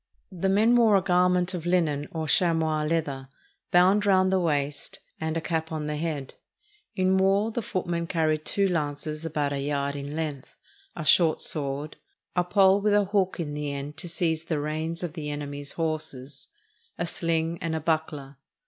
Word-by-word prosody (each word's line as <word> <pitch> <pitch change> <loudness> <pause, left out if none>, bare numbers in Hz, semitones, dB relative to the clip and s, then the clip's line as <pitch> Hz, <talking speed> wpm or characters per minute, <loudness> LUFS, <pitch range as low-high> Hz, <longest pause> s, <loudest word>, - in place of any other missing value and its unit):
The 190 +1 -1
men 220 +5 +4
wore 225 -4 +5
a - - +2
garment 180 0 +2
of 175 -2 -5
hnen, 160 -5 +1
or 160 -1 -3
chamois 160 -2 +2
leather, 145 -5 -2 0.4
bound 185 +4 +5
round 185 -1 +4
the 190 - +3
waist, 145 -4 -1 0.2
and 160 0 -2
a - - -2
cap 160 0 -2
on 155 -1 -3
the 150 0 -2
head. 150 -3 -3 0.6
In 185 0 +2
war 195 +3 +3
the 235 - -2
footmen 175 -4 -2
carried 155 -3 0
two 200 +4 +1
lances 155 -1 -2
about 145 -2 -1
a 140 - -2
yard 140 0 -1
in 145 +1 -5
length, 150 -4 -5 0.4
a 155 - -5
short 160 0 +4
sword, 145 0 -3 0.4
a 180 - +3
pole 190 +2 +4
with 210 0 +3
a 205 -1 +4
hook 195 -2 0
in 150 -3 -3
the 150 -1 -3
end 140 +1 -5
to 175 - -4
seize 165 -1 -1
the 160 -3 -1
reins 155 +3 -3
of 170 -3 -4
the 150 -2 -5
enemy's 145 -1 -4
horses, 155 -4 -3 0.5
a - - -1
sHng, 165 -1 -1
and 165 -1 -2
a - - -1
buckler. 150 -3 -2
160 Hz, 180 wpm, -26 LUFS, 150-180 Hz, 0.6 s, wore